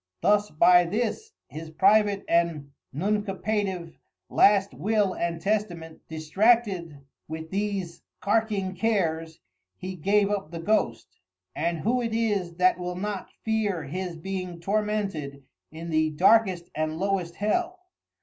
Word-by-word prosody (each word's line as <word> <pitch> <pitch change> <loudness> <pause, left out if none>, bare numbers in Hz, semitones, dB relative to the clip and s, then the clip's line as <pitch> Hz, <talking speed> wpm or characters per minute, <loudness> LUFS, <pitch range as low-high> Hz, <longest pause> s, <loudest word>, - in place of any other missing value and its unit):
Thus 210 0 +3
by 175 +3 +5
this 230 - -2 0.2
his 160 +1 -8
private 200 +4 +3
and 165 -4 +1 0.2
Nuncupative 195 0 -2 0.3
last 200 -1 +4
Will 210 -2 +1
and 170 -1 -2
Testament 175 -4 -2
distracted 170 -1 +1 0.3
with 160 +1 -7
these 195 -3 -3 0.2
carking 205 -3 0
cares, 165 -6 -1 0.4
he 185 0 -6
gave 200 +4 +2
up 200 -5 -2
the 165 0 -6
Ghost: 170 - -1 0.4
And 170 +2 -1
who 245 +3 +1
is 230 -2 -2 0.4
it - - -23
that 185 0 +3
will 180 0 -4
not 200 +1 -4 0.2
fear 210 -6 0
his 175 +4 -5
being 185 0 -5
tormented 195 -8 -2 0.3
in 165 +1 -7
the 155 0 +2
darkest 185 +2 +3
and 155 0 -2
lowest 185 -2 -1
Hell? 350 - -1
185 Hz, 125 wpm, -26 LUFS, 165-210 Hz, 0.4 s, by